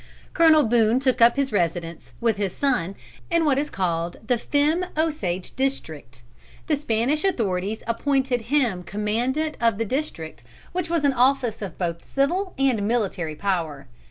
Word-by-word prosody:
Colonel 320 Hz, -3 st, +6 dB
Boone 230 Hz, +1 st, +3 dB
took 260 Hz, -2 st, +1 dB
up 235 Hz, +1 st, +7 dB
his 275 Hz, -2 st, 0 dB
residence, 170 Hz, -3 st, -2 dB
with 230 Hz, -3 st, +1 dB
his 200 Hz, -3 st, -2 dB
son, 245 Hz, -10 st, 0 dB, 0.3 s
in 335 Hz, -2 st, +2 dB
what 275 Hz, -3 st, +3 dB
is 295 Hz, +1 st, -2 dB
called 170 Hz, -2 st, -2 dB
the 240 Hz, 0 st, +1 dB
Femme 300 Hz, +7 st, +1 dB
Osage 210 Hz, -, -1 dB
district. 155 Hz, -, -3 dB, 0.4 s
The 310 Hz, -, +1 dB
Spanish 275 Hz, +1 st, 0 dB
authorities 210 Hz, -, -1 dB
appointed 260 Hz, +1 st, 0 dB
him 235 Hz, -11 st, +2 dB
Commandant 235 Hz, -, -1 dB
of 230 Hz, -3 st, +2 dB
the 225 Hz, -, -1 dB
district, 165 Hz, -, -4 dB, 0.3 s
which 355 Hz, -2 st, -3 dB
was 335 Hz, -3 st, +1 dB
an 280 Hz, -, +3 dB
office 255 Hz, -3 st, +2 dB
of 195 Hz, -5 st, -6 dB
both 170 Hz, -2 st, -4 dB
civil 355 Hz, +8 st, 0 dB
and 250 Hz, -7 st, +1 dB
military 195 Hz, -9 st, -1 dB
power. 165 Hz, -7 st, -2 dB
235 Hz, 155 wpm, -24 LUFS, 190-280 Hz, 0.4 s, up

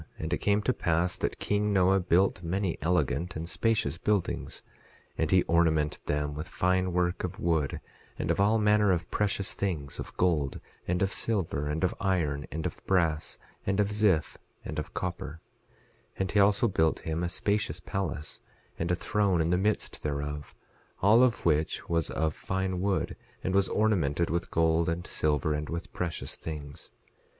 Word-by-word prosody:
11:8 -, -, -7 dB
And 80 Hz, +2 st, -2 dB
it -, -, +2 dB
came 105 Hz, 0 st, +2 dB
to 130 Hz, -, +2 dB
pass 85 Hz, 0 st, +1 dB
that -, -, -2 dB
king 105 Hz, 0 st, 0 dB
Noah 95 Hz, 0 st, +4 dB
built 90 Hz, +1 st, +2 dB
many 90 Hz, +1 st, -1 dB
elegant 85 Hz, 0 st, 0 dB
and 80 Hz, +1 st, -4 dB
spacious 110 Hz, -2 st, +1 dB
buildings; 105 Hz, -3 st, -1 dB, 0.5 s
and 80 Hz, -, 0 dB
he 95 Hz, -1 st, +5 dB
ornamented 80 Hz, -3 st, +2 dB
them 75 Hz, 0 st, 0 dB
with 75 Hz, +3 st, -5 dB
fine 90 Hz, 0 st, +1 dB
work 90 Hz, 0 st, 0 dB
of 90 Hz, +3 st, -4 dB
wood, 80 Hz, -7 st, 0 dB, 0.4 s
and -, -, 0 dB
of -, -, -1 dB
all 105 Hz, +3 st, +4 dB
manner 105 Hz, -1 st, +4 dB
of 85 Hz, -1 st, -1 dB
precious 100 Hz, -2 st, 0 dB
things, 80 Hz, -8 st, -2 dB
of -, -, -7 dB
gold, 80 Hz, -7 st, +1 dB, 0.3 s
and 90 Hz, +2 st, +1 dB
of 95 Hz, -, 0 dB
silver, 90 Hz, -10 st, -1 dB
and 75 Hz, +4 st, -2 dB
of 90 Hz, -, +2 dB
iron, 80 Hz, -7 st, 0 dB
and 80 Hz, 0 st, -4 dB
of -, -, -4 dB
brass, 85 Hz, -5 st, +1 dB, 0.3 s
and 95 Hz, +1 st, 0 dB
of 100 Hz, -1 st, +3 dB
ziff, 105 Hz, -7 st, +2 dB, 0.3 s
and -, -, -3 dB
of -, -, -7 dB
copper; 80 Hz, +4 st, -4 dB, 0.8 s
11:9 -, -, -2 dB
And 95 Hz, -, -1 dB
he 105 Hz, -, +3 dB
also 100 Hz, +3 st, +5 dB
built 80 Hz, -6 st, +1 dB
him 80 Hz, +1 st, -2 dB
a 85 Hz, -, 0 dB
spacious 105 Hz, +3 st, -1 dB
palace, 85 Hz, -6 st, -4 dB, 0.4 s
and 85 Hz, -, -1 dB
a 90 Hz, -, +3 dB
throne 100 Hz, -1 st, +1 dB
in 80 Hz, +1 st, +1 dB
the -, -, +4 dB
midst 105 Hz, +4 st, 0 dB
thereof, 75 Hz, 0 st, -4 dB, 0.5 s
all 110 Hz, +5 st, +7 dB
of 125 Hz, -2 st, +2 dB
which 80 Hz, -1 st, +1 dB
was 85 Hz, -2 st, 0 dB
of 80 Hz, 0 st, 0 dB
fine 95 Hz, 0 st, -2 dB
wood 100 Hz, 0 st, 0 dB, 0.3 s
and 95 Hz, -, -1 dB
was 100 Hz, 0 st, +3 dB
ornamented 85 Hz, -8 st, +1 dB
with 85 Hz, +1 st, -1 dB
gold 80 Hz, +1 st, +2 dB
and 85 Hz, +1 st, -2 dB
silver 75 Hz, 0 st, 0 dB
and 75 Hz, 0 st, -3 dB
with 85 Hz, +1 st, -5 dB
precious 85 Hz, -3 st, -3 dB
things. 75 Hz, -1 st, -7 dB
90 Hz, 180 wpm, -29 LUFS, 80-100 Hz, 0.8 s, all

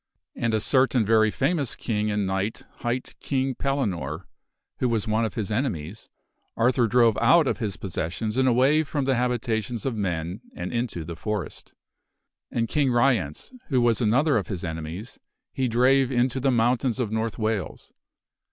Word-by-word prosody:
And 115 Hz, -1 st, 0 dB
a -, -, +2 dB
certain 130 Hz, -1 st, +2 dB
very 110 Hz, 0 st, +4 dB
famous 145 Hz, +2 st, 0 dB
king 105 Hz, -2 st, -1 dB
and 105 Hz, -1 st, 0 dB
knight 95 Hz, +3 st, -2 dB
court -, -, -24 dB
hight 120 Hz, +1 st, -3 dB
King 135 Hz, -1 st, -1 dB
Pellinore 95 Hz, -, -2 dB, 0.5 s
(who 125 Hz, -, +1 dB
was 115 Hz, -2 st, 0 dB
one 110 Hz, +1 st, +1 dB
of 110 Hz, -, -5 dB
his 110 Hz, -3 st, -3 dB
enemies) 105 Hz, -, -3 dB, 0.5 s
Arthur 120 Hz, +1 st, +3 dB
drove 115 Hz, -1 st, +4 dB
out 170 Hz, -2 st, +5 dB
of -, -, -1 dB
his 105 Hz, -5 st, -3 dB
possessions 100 Hz, +4 st, -3 dB
and 130 Hz, 0 st, +3 dB
away 130 Hz, +5 st, +4 dB
from 145 Hz, -2 st, -2 dB
the 135 Hz, -, +2 dB
habitations 120 Hz, -2 st, -1 dB
of 135 Hz, -, 0 dB
men 90 Hz, -1 st, -3 dB
and 90 Hz, +4 st, -5 dB
into 115 Hz, -9 st, -2 dB
the 85 Hz, +1 st, -6 dB
forest. 105 Hz, +2 st, -5 dB, 0.8 s
And 115 Hz, -1 st, -1 dB
King 140 Hz, +1 st, +1 dB
Ryence 120 Hz, -, +1 dB
(who 130 Hz, -4 st, +2 dB
was 120 Hz, 0 st, +2 dB
another 130 Hz, +5 st, +3 dB
of 100 Hz, -5 st, -2 dB
his 95 Hz, -3 st, -5 dB
enemies) 80 Hz, +6 st, -6 dB, 0.3 s
he 130 Hz, -1 st, 0 dB
drave 130 Hz, +3 st, +3 dB
into 125 Hz, +1 st, +1 dB
the 135 Hz, +1 st, +1 dB
mountains 125 Hz, +1 st, +1 dB
of 115 Hz, -4 st, -1 dB
North 110 Hz, 0 st, -2 dB
Wales. 110 Hz, -6 st, -3 dB
115 Hz, 170 wpm, -25 LUFS, 105-130 Hz, 0.8 s, out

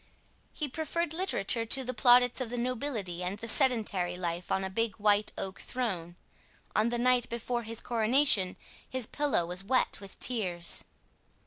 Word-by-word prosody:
He 305 Hz, -, -3 dB
preferred 315 Hz, +3 st, -2 dB
literature 290 Hz, -, +1 dB
to 265 Hz, +4 st, +3 dB
the 255 Hz, 0 st, -3 dB
plaudits 245 Hz, +2 st, +5 dB
of 250 Hz, -, -2 dB
the 245 Hz, -, -3 dB
nobility 235 Hz, -7 st, -2 dB
and 185 Hz, +3 st, -3 dB
the 230 Hz, -, -5 dB
sedentary 210 Hz, -8 st, +2 dB
life 175 Hz, 0 st, -3 dB
on 190 Hz, -, +1 dB
a 190 Hz, -, -3 dB
big 225 Hz, +1 st, 0 dB
white 210 Hz, 0 st, +2 dB
oak 190 Hz, -1 st, -4 dB
throne. 185 Hz, -9 st, -3 dB, 0.6 s
On 215 Hz, +2 st, +3 dB
the 240 Hz, -, -1 dB
night 250 Hz, 0 st, +2 dB
before 235 Hz, +1 st, -2 dB
his 230 Hz, 0 st, -3 dB
coronation 230 Hz, -4 st, +2 dB, 0.3 s
his 260 Hz, -3 st, -2 dB
pillow 285 Hz, -, +1 dB
was 180 Hz, +2 st, -4 dB
wet 255 Hz, -1 st, +1 dB
with 195 Hz, -1 st, -12 dB
tears. 180 Hz, -8 st, 0 dB
230 Hz, 160 wpm, -30 LUFS, 190-255 Hz, 0.6 s, plaudits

